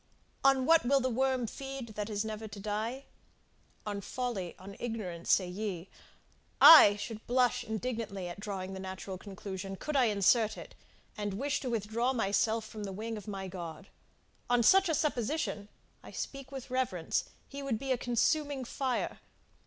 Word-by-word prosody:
On 270 -1 +4
what 330 +2 +6
will 275 +3 +4
the 260 -1 0
worm 260 0 +1
feed 270 +1 -6
that 210 0 -4
is 210 0 -2
never 220 0 -5
to 205 -1 -9
die? 220 +6 -3 0.8
On 205 -1 -3
folly, 205 -5 -4
on 195 +2 -10
ignorance, 200 -8 -3
say 185 - +4
ye 185 -1 -4 0.7
I 250 -11 +11
should 215 +1 -7
blush 250 0 +2
indignantly 220 -4 -4
at 175 +2 -7
drawing 195 -2 -5
the 190 - -6
natural 190 0 -6
conclusion, 195 -1 -6
could 300 +9 -5
I 260 -3 +5
insert 215 +1 +3
it, - - -10 0.4
and 205 -2 -3
wish 280 +6 -1
to 255 - -4
withdraw 230 +3 0
myself 220 0 +1
from 215 -1 -8
the 195 - -4
wing 220 +4 -4
of 210 -2 -9
my 195 -2 -4
God! 180 +1 -8 0.6
On 245 -1 +4
such 385 +8 +6
a 320 - +2
supposition, 270 -7 -1 0.3
I - - -12
speak 275 -1 -6
with 265 -2 -8
reverence, 245 -11 0 0.2
he 280 0 -7
would 270 -5 -1
be 270 +3 -4
a - - +4
consuming 275 +3 +1
fire. 260 0 -2
220 Hz, 170 wpm, -31 LUFS, 200-255 Hz, 0.8 s, I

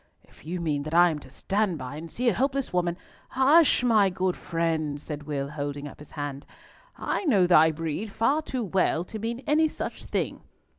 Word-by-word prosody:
"If - - -21
you 180 +2 -3
mean 150 -4 -1
that 155 +3 -4
I 175 0 +6
am 155 - -4
to - - -14
stand 195 +5 -1
by 130 0 -6
and 165 +2 -7
see 245 +7 -2
a 235 - +5
helpless 275 -3 -1
woman—" 175 -1 0 0.3
"Hush! 275 +2 +4
my 215 -5 +4
good 185 0 -1
friend," 160 -3 -1
said 150 0 -6
Will, 140 -2 -2
holding 145 -1 -4
up - - -12
his 150 - -13
hand. 145 -2 -5 0.5
"I - - -2
know 205 - +4
thy 160 -3 +6
breed 165 +6 -4
far 275 +9 +1
too 260 -5 -3
well 185 -4 +1
to 215 +4 -8
mean 235 +4 -4
any 315 +2 +3
such - - -6
thing. - - -2
175 Hz, 200 wpm, -26 LUFS, 150-225 Hz, 0.5 s, I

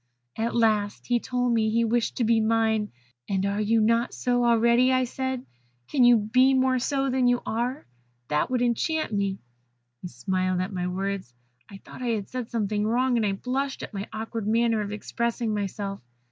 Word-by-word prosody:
"At 225 +1 -2
last 215 -3 +1
he 245 -1 +1
told 245 0 -1
me 220 -1 +2
that - - -3
he 230 +1 +3
wished 235 +1 0
to 245 - +1
be 225 0 +3
mine. 220 -1 +1 0.4
'And 195 -1 0
are 200 +1 -1
you 225 +2 +2
not 230 +2 +2
so 245 -1 +1
already?' 240 +2 +4
said 260 +1 -3
I. - - -23 0.5
'Can 265 - +3
you 240 -1 +7
be 255 +5 +3
more 260 0 +2
so 270 +1 0
than 255 -1 +2
you 245 0 +3
are? 245 +5 -2 0.4
That 150 +7 +1
would 250 -1 +1
enchant 245 +3 0
me.' 200 -1 0 0.6
He - - -5
smiled 185 0 -1
at 185 +2 -3
my 180 -1 -2
words. 190 -7 -4 0.3
I 195 - -10
thought - - -11
I 250 - -2
had 205 -3 -5
said 250 -3 -5
something 210 -2 -1
wrong, 250 +2 +2
and 230 - +1
I 200 - 0
blushed 265 +6 -3
at - - -8
my 200 +1 -5
awkward 225 -1 -5
manner 230 0 +2
of 205 -1 -4
expressing 230 +1 -2
myself. 200 -1 -4
230 Hz, 195 wpm, -26 LUFS, 205-245 Hz, 0.6 s, you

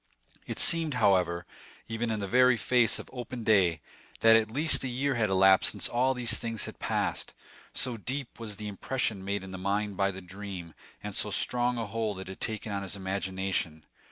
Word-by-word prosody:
It - - -4
seemed, 165 -4 +5
however, 90 -6 +2 0.4
even 115 +1 -2
in 110 -1 -1
the 100 - -3
very 125 +3 +5
face 120 +2 +3
of - - -9
open 125 -1 -6
day, 95 -7 +3 0.4
that 115 0 +7
at 110 -1 +3
least 150 +7 +2
a - - -1
year 135 +3 0
had 115 -4 +1
elapsed 95 0 +6
since - - -1
all 130 +2 +1
these 120 -2 0
things 115 -1 -3
had - - -9
passed, - - -1 0.4
so 125 -2 -1
deep 130 +5 -5
was 110 -3 -5
the 105 +1 -6
impression 105 0 -2
made 100 0 -2
in 95 0 -9
his 95 - -7
mind 100 +1 -1
by 100 -1 +2
the 95 -1 -6
dream, 95 -2 -8 0.3
and 105 -1 -5
so 105 - +1
strong 120 +4 +1
a 115 - -2
hold 110 -1 -3
had 95 0 -7
it 95 - -9
taken 110 -1 -4
of 100 -1 -2
his 95 0 -4
imagination. 95 -4 -3
105 Hz, 200 wpm, -29 LUFS, 95-120 Hz, 0.4 s, that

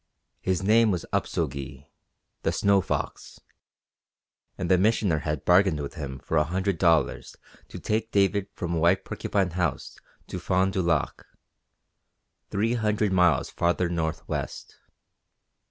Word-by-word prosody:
His 95 0 -1
name 110 +3 +4
was 90 -5 -1
Upso - - 0
Gee 70 0 -8 0.6
(the - - 0
Snow 100 -1 +3
Fox), - - -4 1.2
and 90 - -3
the 90 0 +4
Missioner 100 -5 +2
had 75 -1 -3
bargained 90 -3 +4
with 70 -1 -5
him 70 -5 -6
for 80 +4 -2
a 75 - +4
hundred 95 +2 -2
dollars 85 -3 +1 0.3
to - - -9
take 110 +1 -2
David 100 0 +2
from 85 -3 -3
White 85 +3 +3
Porcupine 95 -3 -1
House 90 +1 -3 0.3
to 90 - -6
Fond 95 +2 +1
du 95 - 0
Lac, 85 -3 0 1.3
three 110 +4 0
hundred 105 -3 0
miles 90 -6 +3
farther 85 +1 0
northwest. 80 -2 -4
90 Hz, 135 wpm, -26 LUFS, 80-100 Hz, 1.3 s, name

